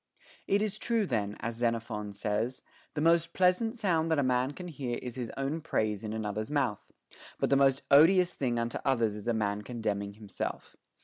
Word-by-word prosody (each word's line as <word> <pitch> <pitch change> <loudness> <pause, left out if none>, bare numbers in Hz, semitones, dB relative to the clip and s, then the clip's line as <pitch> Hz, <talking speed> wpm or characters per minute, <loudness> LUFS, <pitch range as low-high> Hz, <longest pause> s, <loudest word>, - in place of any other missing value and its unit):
It 200 +1 +3
is 210 -3 -2
true 230 -3 +1
then, 105 - -2
as 115 0 -3
Xenophon 115 -3 -1
says, 105 +5 -2 0.3
The 150 - -1
most 165 +1 +3
pleasant 190 +6 +2
sound 170 -8 +1
that 160 - +2
a 145 - +3
man 130 0 +2
can 180 +2 -8
hear 130 -7 -4
is 125 -1 -6
his 120 -2 -5
own 140 +4 -2
praise 110 -9 -1
in 110 - -4
another's 110 +1 -3
mouth; 135 -8 -1 0.5
but - - 0
the - - +6
most 135 0 +3
odious 175 +5 +6
thing 125 -3 -1
unto 115 0 -2
others 115 -6 +2
is 105 +1 -8
a 120 - +2
man 105 -1 -1
commending 105 -3 -3
himself. 105 -1 -6
125 Hz, 190 wpm, -30 LUFS, 110-160 Hz, 0.5 s, the